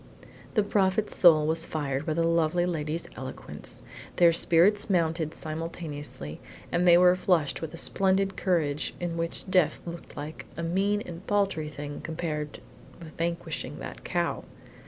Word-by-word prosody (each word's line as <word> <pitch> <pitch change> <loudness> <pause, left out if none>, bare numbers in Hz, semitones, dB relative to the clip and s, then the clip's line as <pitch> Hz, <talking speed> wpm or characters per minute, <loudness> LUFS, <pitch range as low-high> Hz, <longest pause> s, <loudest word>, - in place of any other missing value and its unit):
The 215 - +4
Prophet's 200 +1 +1
soul 155 -4 +6
was 160 +1 0
fired 145 -1 -2
by 155 - 0
the 165 0 +2
lovely 170 +1 +2
lady's 160 -1 -2
eloquence. 130 +1 -9 0.3
Their 170 -1 +6
spirits 190 +6 +4
mounted 165 -3 +1
simultaneously, 155 - -6 0.3
and 175 +1 +2
they 170 0 +8
were 180 0 +6
flushed 175 -5 +1
with 160 - -4
a 165 - -8
splendid 195 +2 +2
courage 155 -6 0
in 175 -1 -3
which 165 +2 -3
death 185 -4 +3
looked 170 0 -8 0.4
a 170 - -3
mean 195 +5 +1
and 175 +1 -9
paltry 195 -7 +1
thing 145 -1 -7
compared 155 -2 -4 0.4
with 160 -3 -11
vanquishing 170 0 -3
that - - -8
cow. - - -1
170 Hz, 145 wpm, -28 LUFS, 155-180 Hz, 0.4 s, they